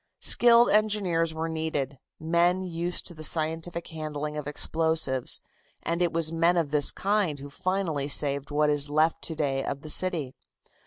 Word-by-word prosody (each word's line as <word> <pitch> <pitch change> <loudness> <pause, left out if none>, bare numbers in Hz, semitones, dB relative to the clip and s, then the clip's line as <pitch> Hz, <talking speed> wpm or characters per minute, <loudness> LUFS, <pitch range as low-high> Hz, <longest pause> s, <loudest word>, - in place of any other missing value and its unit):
Skilled 235 0 +5
engineers 200 -6 +1
were 160 +1 -4
needed, 155 -4 -3 0.2
men 170 +3 +1
used 175 0 0
to 175 - -5
the 155 - -12
scientific 165 +2 -1
handling 150 -2 -5
of 150 -1 -5
explosives, 155 -3 0 0.4
and 170 +1 -2
it 175 - +1
was 165 -1 0
men 170 +2 +2
of 160 -4 -1
this 150 -2 +2
kind 200 -6 -1
who 140 0 -10
finally 185 -5 -2
saved 140 -1 +2
what 150 0 +1
is 145 0 -1
left 155 +2 +1
to 160 - -6
day 135 -3 -1
of 140 - -5
the 155 - 0
city. 165 -9 +2
160 Hz, 165 wpm, -26 LUFS, 150-175 Hz, 0.4 s, Skilled